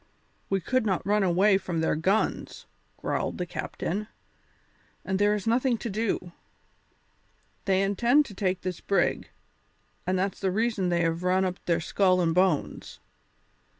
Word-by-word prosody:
"We 195 - +1
could 255 +8 0
not 195 -4 -1
run 210 +1 +2
away 190 +2 +4
from 175 -4 -3
their 160 - +1
guns," 190 +7 -1 0.3
growled - - -2
the 180 - -2
captain, 200 +3 -4 1.0
"and 190 0 -1
there 205 +1 +3
is 205 - -5
nothing 240 +2 +2
to 230 - -5
do. 205 -4 -2 1.3
They 190 0 +2
intend 235 +9 +3
to 210 - -10
take 190 -2 -1
this 180 -2 -4
brig, 200 - 0 0.8
and 185 0 +1
that's 190 +1 -1
the 195 - 0
reason 215 -2 0
they 170 -1 +1
have 165 0 0
run 185 +1 +2
up 185 -1 -4
their 170 -1 +2
skull 185 +2 +2
and 165 -2 +2
bones. 180 -4 0
190 Hz, 150 wpm, -27 LUFS, 180-210 Hz, 1.3 s, away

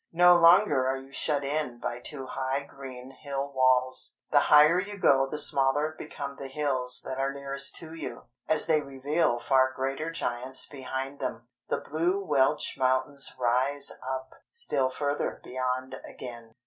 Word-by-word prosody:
No 175 +1 +7
longer 170 -6 +5
are 135 0 0
you 135 +1 -12
shut 145 0 0
in 140 -3 -2
by 120 - -4
two 135 +1 -5
high 135 +1 -2
green 135 -2 -10
hill 140 +1 -5
walls, 130 -1 +2 0.2
the - - +6
higher 150 +4 +7
you 200 +2 -5
go 135 -7 +4
the 150 - -4
smaller 145 +1 +3
become 140 -2 -7
the 135 - -6
hills 130 -3 +1
that 130 0 -4
are 135 0 0
nearest 140 0 -3
to 160 -1 -8
you, 165 -2 -7 0.3
as 155 -1 +3
they 155 -2 +3
reveal 140 0 0
far 130 +2 +3
greater 135 +4 -2
giants 130 -5 -3
behind 135 0 -5
them. 120 -2 -5 0.2
The - - -1
blue 170 +6 0
Welsh 145 -6 +1
mountains 130 +2 0
rise 130 +3 +1
up, 130 0 -5 0.2
still 305 - 0
further 145 +2 -2
beyond 130 0 -3
again. 120 -3 -10
135 Hz, 160 wpm, -28 LUFS, 130-150 Hz, 0.3 s, No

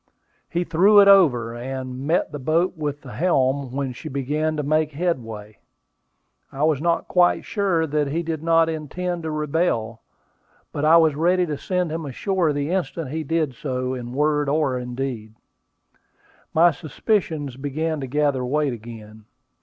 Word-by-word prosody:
He 175 0 -1
threw 190 +5 +5
it 200 - +7
over, 135 - +5
and 130 +2 -6
met 165 +3 +1
the 145 - -6
boat 165 +7 +1
with 145 -2 -4
the 130 - -11
helm 135 -2 +1
when 135 -1 -3
she - - -8
began 150 +4 -1
to 150 - -1
make 155 +1 +1
headway. 115 - -4 0.9
I 135 +2 -3
was 155 -3 +2
not 170 +1 0
quite 180 -1 +3
sure 190 -6 0
that 150 -1 0
he 165 +5 -2
did 160 -2 -3
not 165 0 +3
intend 170 +3 -4
to 160 - -4
rebel; 150 -7 -1 0.7
but 145 - -2
I 160 +2 +7
was 160 -2 +4
ready 180 +4 +2
to 155 -3 -3
send 180 +2 -2
him 160 -1 -4
ashore 175 +4 0
the 145 +2 -2
instant 170 -6 -2
he 160 +1 -3
did 155 -2 -1
so 130 0 -3
in 120 -2 -6
word 150 0 +1
or 140 -4 0
deed. 125 -3 -5 1.2
My 170 +2 +5
suspicions 155 - -2
began 150 +4 -3
to 135 - -5
gather 145 -1 0
weight 140 +1 0
again. 110 -2 -11
150 Hz, 160 wpm, -23 LUFS, 130-165 Hz, 1.2 s, it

